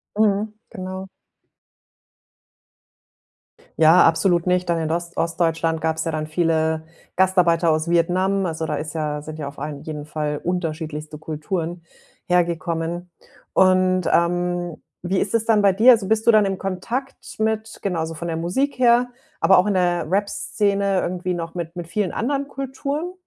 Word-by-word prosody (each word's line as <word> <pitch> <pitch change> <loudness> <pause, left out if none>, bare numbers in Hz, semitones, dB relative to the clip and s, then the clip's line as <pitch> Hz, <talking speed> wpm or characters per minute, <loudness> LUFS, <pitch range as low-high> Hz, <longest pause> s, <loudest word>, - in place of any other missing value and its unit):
Mhm, 210 0 +1 0.2
genau. 185 0 -6 2.7
Ja, 160 +3 +7
absolut 170 +1 +2
nicht, 180 0 +1
dann 170 -1 +1
in 160 - -2
Ost 170 0 -3
Ostdeutschland 165 -1 0
gab's 160 0 0
ja 165 - -2
dann 155 -1 -2
viele 160 0 0 0.3
Gastarbeiter 180 -2 +3
aus 155 +1 +1
Vietnam. 185 +3 +1
Also, 160 0 -3
da 150 - -2
ist 150 +2 -5
ja 150 -2 -2
sind 155 +1 -8
ja 150 -3 -5
auf 140 0 -9
allen 145 0 -6
jeden 150 -2 -6
Fall 150 -1 -3
unterschiedlichste 155 -3 -4
Kulturen 165 +2 -4 0.4
hergekommen. 170 0 -1 0.4
Und, 185 -1 +3
ähm, 175 0 0 0.2
wie 185 +2 0
ist 205 - -1
es 225 -1 +1
dann 220 -2 +4
bei 200 -1 +4
dir? 230 +7 +7
Also, 220 -5 +3
bist 220 +1 +1
du 235 - +7
dann 215 -2 +5
im 195 -1 -1
Kontakt 230 +9 -4 0.2
mit 220 0 -1
genau, 180 -4 -1
also, 160 0 -3
von 170 +2 -5
der 165 - -2
Musik 255 +12 -1
her, 245 0 +4 0.3
aber 190 - +6
auch 185 - +2
in 200 - +1
der 175 -2 +1
Rapsszene 200 0 0
irgendwie 180 0 -2
noch 165 -1 -5
mit 170 -1 -5
mit 175 - -5
vielen 195 +1 -1
anderen 280 +3 -1
Kulturen? 280 +5 -4
175 Hz, 160 wpm, -22 LUFS, 160-195 Hz, 2.7 s, Ja